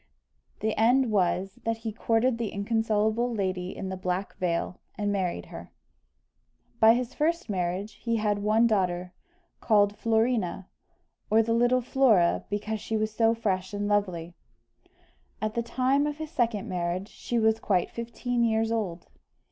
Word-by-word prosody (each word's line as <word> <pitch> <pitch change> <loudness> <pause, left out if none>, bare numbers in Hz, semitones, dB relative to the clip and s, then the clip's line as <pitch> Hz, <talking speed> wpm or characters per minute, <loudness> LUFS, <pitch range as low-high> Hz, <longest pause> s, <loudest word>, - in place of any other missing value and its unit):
The 215 +1 0
end 245 +2 +4
was, 190 -1 0
that 225 0 -1
he 220 - -1
courted 230 +2 +1
the 230 -3 -1
inconsolable 220 +2 0
lady 185 -4 -2
in 190 - -4
the 190 - -3
black 185 +1 -3
veil, 175 0 -2 0.2
and 205 -1 0
married 185 - -2
her. - - -9 1.1
By 225 +1 +7
his 250 +1 -3
first 330 -4 0
marriage 185 +3 -3
he 230 -1 0
had 210 -2 0
one 215 +3 +3
daughter, 180 -5 0 0.5
called 205 -2 +3
Florina, 220 -5 0 0.6
or 225 +1 +5
the 230 +1 0
little 245 +2 +3
Flora, 235 -9 +3
because 210 +1 -3
she 220 - -2
was 215 0 -1
so 225 +1 +3
fresh 195 -3 -2
and 205 0 -2
lovely; 185 -5 -1 1.1
at 215 0 -2
the 235 - 0
time 260 +5 +1
of 295 0 -4
his 315 -1 -6
second 235 - 0
marriage 180 0 -2
she 240 - -4
was 220 0 +3
quite 185 -5 0
fifteen 235 +1 -2
years 225 0 +1
old. 190 -7 -2
215 Hz, 155 wpm, -27 LUFS, 190-230 Hz, 1.1 s, By